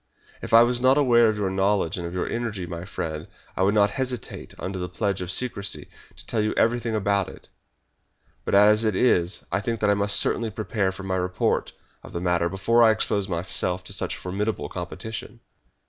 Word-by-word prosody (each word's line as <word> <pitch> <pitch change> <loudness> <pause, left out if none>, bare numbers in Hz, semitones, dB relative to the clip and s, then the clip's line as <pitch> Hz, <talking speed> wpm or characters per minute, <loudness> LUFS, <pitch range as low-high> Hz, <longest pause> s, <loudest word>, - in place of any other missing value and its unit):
If - - -7
I 115 +1 +8
was 120 0 +1
not 130 +2 +5
aware 120 -5 +5
of 110 - -1
your 100 -2 -1
knowledge 95 -2 +1
and 85 -2 -4
of 85 - -7
your 90 - -1
energy, 115 -6 -3
my 85 0 -6
friend, 80 -5 -5 0.3
I - - -2
would 100 +3 +3
not 105 0 +4
hesitate, 130 -4 -4
under 95 0 -5
the 90 0 -4
pledge 100 +1 -2
of 90 - -5
secrecy, 100 -3 -2 0.3
to - - -11
tell 110 - 0
you 105 - -1
everything 115 -1 +1
about 100 -2 +1
it. - - -14 0.9
But - - 0
as 105 +2 +6
it 110 -3 +1
is 90 -5 +2
I 100 +3 0
think 115 +2 -2
that 105 -1 +2
I - - +5
must 100 0 +3
certainly 115 -1 0
prepare 105 -2 -1
my 95 0 -3
own 95 - +1
report 90 0 -1 0.3
of - - -13
the 85 - -2
matter 85 -1 +1
before 100 +6 +2
I 115 - +7
expose 105 -2 0
myself 90 +1 -2
to - - -5
such - - -2
formidable 105 +4 -3
competition." 105 +5 -6
100 Hz, 205 wpm, -25 LUFS, 90-115 Hz, 0.9 s, I